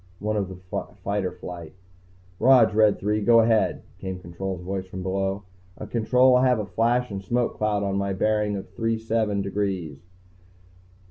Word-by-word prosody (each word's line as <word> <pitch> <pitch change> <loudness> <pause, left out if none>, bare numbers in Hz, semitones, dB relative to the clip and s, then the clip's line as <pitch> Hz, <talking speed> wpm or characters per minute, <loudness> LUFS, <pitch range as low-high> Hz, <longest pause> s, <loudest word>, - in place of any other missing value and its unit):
One 105 +2 -2
of 100 -3 -1
the 95 - -8 0.5
fighter 100 -2 -1
flight. 85 -2 -9 0.7
"Rog, 125 -4 +6
Red 105 -1 +4
Three, 105 +1 -1
go 115 +2 +6
ahead," 110 -2 +2 0.2
came 95 -1 -5
Control's 90 +1 -6
voice 95 0 -4
from 95 0 -7
below. 95 +1 -2 0.3
"Uh, - - -7
Control, 125 +3 +3
I 130 +1 +4
have 125 -1 +3
a 105 - -2
flash 120 +3 0
and 100 -1 -4
smoke 120 +4 -1
cloud 105 -1 0
on 100 0 -1
a 100 0 -1
bearing 105 +1 +1
of 95 - -6
three 115 +3 -1
seven 110 -3 -1
degrees." 95 -5 -3
105 Hz, 170 wpm, -25 LUFS, 95-115 Hz, 0.7 s, Rog